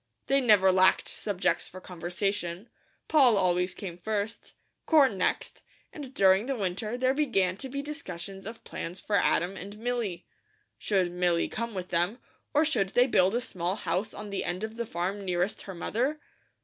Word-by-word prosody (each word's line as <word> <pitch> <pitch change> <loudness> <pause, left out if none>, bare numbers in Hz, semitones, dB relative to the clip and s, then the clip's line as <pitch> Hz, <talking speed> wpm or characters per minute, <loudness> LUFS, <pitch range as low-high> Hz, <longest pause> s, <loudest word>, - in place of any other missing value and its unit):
They 275 0 +3
never 205 -6 +5
lacked 185 0 +4
subjects 200 -4 -1
for 185 - -10
conversation. 180 +2 -3 0.4
Poll 265 -8 +5
always 180 -1 +1
came 180 -4 -7
first, 215 +3 -3 0.3
corn 280 -9 +5
next, 185 - -1 0.3
and 280 -4 -8
during 195 -2 +4
the 275 - -1
winter 210 +2 -2
there 255 +1 +2
began 215 -11 +1
to 265 - -4
be 280 +2 -4
discussion 195 - -6
of 225 +1 -8
plans 175 +3 -6
for 205 - -2
Adam 185 -1 +2
and 200 +2 -8
Milly. 225 -6 -3 0.5
Should 190 -4 +1
Milly 175 -1 +1
come 230 -1 -4
with 185 -1 -5
them, 175 +7 +1 0.3
or 305 +1 +3
should 215 -11 +1
they 245 +5 +4
build 195 -5 +3
a 240 - +1
small 180 -4 -3
house 190 +2 -2
on 210 -1 -8
the 200 - -2
end 180 +3 -3
of 220 0 -4
the 235 -1 -4
farm 190 +3 -3
nearest 180 +1 -1
her 190 - -6
mother? 255 - -1
200 Hz, 175 wpm, -28 LUFS, 180-235 Hz, 0.5 s, never